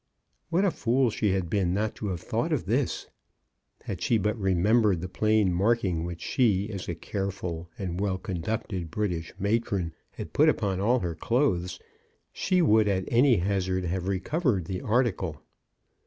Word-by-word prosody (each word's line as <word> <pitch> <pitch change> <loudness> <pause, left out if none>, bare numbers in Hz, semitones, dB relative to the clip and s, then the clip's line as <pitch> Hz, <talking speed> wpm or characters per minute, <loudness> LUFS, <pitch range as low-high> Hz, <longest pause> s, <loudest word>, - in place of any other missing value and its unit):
What 175 +4 +2
a 190 - +3
fool 125 -2 +1
she 105 0 0
had 95 -3 -1
been 95 0 0
not 110 +2 0
to 105 - -4
have 90 -4 -3
thought - - -1
of - - 0
this! - - -1 0.8
Had - - -5
she 115 - +2
but 105 +1 0
re 95 -1 +2
membered 105 0 +3
the 90 - -4
plain 105 -2 +2
marking 95 -3 +1
which 85 -1 -6
she, 105 -5 +1
as 95 -4 -5
a 85 - -2
careful, 90 -3 -4
well 95 0 -1
conducted 95 -1 -3
British 85 -2 -2
matron, 100 -5 0 0.2
had - - -8
put - - +5
upon 95 -2 0
all 120 +5 +2
her 85 -2 -2
clothes, 90 - 0 0.5
she 185 -2 +2
would 110 -6 +4
at 95 -2 0
any 125 +1 +5
hazard 95 -1 0
have 90 +1 -2
recovered 100 - 0
the 90 +1 -4
article. 105 - 0
100 Hz, 165 wpm, -27 LUFS, 90-110 Hz, 0.8 s, put